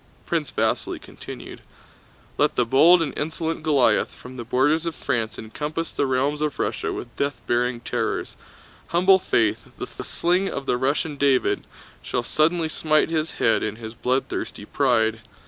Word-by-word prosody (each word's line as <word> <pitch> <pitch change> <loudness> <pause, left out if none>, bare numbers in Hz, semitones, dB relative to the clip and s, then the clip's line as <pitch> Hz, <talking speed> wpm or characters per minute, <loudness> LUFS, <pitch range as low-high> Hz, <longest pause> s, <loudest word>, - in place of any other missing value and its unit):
Prince - - -1
Vasíli - - 0
continued. - - -10 0.8
"Let - - +3
the 125 - +2
bold 165 +8 +6
and 145 - -4
insolent 160 +1 -2
Goliath 150 -5 +3
from 130 +1 -11
the 120 - -5
borders 145 +8 +2
of 165 - -3
France 115 -5 -2
encompass 150 +9 -4
the 140 - 0
realms 135 +3 0
of 150 -1 -1
Russia - - -1
with 120 -1 -7
death 140 -2 -1
bearing 120 0 0
terrors; 120 - -2 0.5
humble 185 +3 +5
Faith, 110 - +1
the - - -7
sling 180 +3 +1
of 140 - -4
the 125 - +1
Russian 140 +3 0
David, 140 -2 +2 0.3
shall 120 - -2
suddenly 160 +5 +2
smite 155 0 +1
his 160 -1 -1
head 115 - +2
in 110 0 -2
his 110 0 -8
bloodthirsty 125 +3 -2
pride. 110 0 +1
140 Hz, 155 wpm, -24 LUFS, 120-160 Hz, 0.8 s, bold